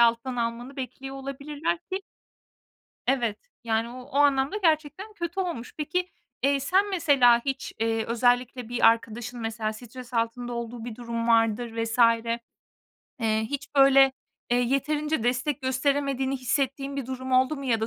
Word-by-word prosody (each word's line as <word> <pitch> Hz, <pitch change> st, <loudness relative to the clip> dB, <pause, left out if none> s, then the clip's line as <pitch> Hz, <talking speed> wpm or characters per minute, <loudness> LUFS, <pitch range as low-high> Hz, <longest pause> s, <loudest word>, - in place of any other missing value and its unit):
alttan 235 Hz, +2 st, +3 dB
almanı 235 Hz, +3 st, -3 dB
bekliyor 270 Hz, +1 st, -6 dB
olabilirler 285 Hz, +5 st, -3 dB
ki 375 Hz, +3 st, -5 dB, 1.1 s
evet, 240 Hz, -5 st, +1 dB, 0.3 s
yani, 225 Hz, 0 st, 0 dB
o 250 Hz, +1 st, -8 dB
o 275 Hz, +2 st, -6 dB
anlamda 285 Hz, +5 st, +3 dB
gerçekten 325 Hz, +3 st, 0 dB
kötü 345 Hz, -2 st, -4 dB
olmuş. 340 Hz, -11 st, -3 dB
Peki, 360 Hz, +4 st, -1 dB, 0.3 s
eee, 275 Hz, 0 st, +3 dB
sen 380 Hz, +9 st, +2 dB
mesela 275 Hz, -10 st, +5 dB
hiç, 270 Hz, -1 st, -3 dB
eee, 225 Hz, 0 st, 0 dB
özellikle 245 Hz, 0 st, +1 dB
bir 240 Hz, -2 st, +4 dB
arkadaşın 230 Hz, +1 st, 0 dB
mesela 225 Hz, -1 st, -2 dB
stres 245 Hz, +2 st, -11 dB
altında 235 Hz, +1 st, -1 dB
olduğu 235 Hz, 0 st, -5 dB
bir 230 Hz, -3 st, -6 dB
durum 235 Hz, -1 st, -3 dB
vardır 230 Hz, 0 st, +3 dB
vs. 230 Hz, +2 st, -3 dB, 1.2 s
Eee, 220 Hz, -1 st, +2 dB
hiç 285 Hz, 0 st, -5 dB
böyle, 270 Hz, -1 st, +7 dB, 0.4 s
eee, 240 Hz, -, +4 dB
yeterince 295 Hz, +2 st, 0 dB
destek 260 Hz, +3 st, 0 dB
gösteremediğini 270 Hz, 0 st, 0 dB
hissettiğin 275 Hz, +2 st, -1 dB
bir 275 Hz, -, -3 dB
durum 260 Hz, 0 st, -5 dB
oldu 260 Hz, +4 st, +3 dB
mu? 275 Hz, -, -7 dB
ya 230 Hz, -4 st, +1 dB
da 220 Hz, -, 0 dB
260 Hz, 150 wpm, -26 LUFS, 235-280 Hz, 1.2 s, böyle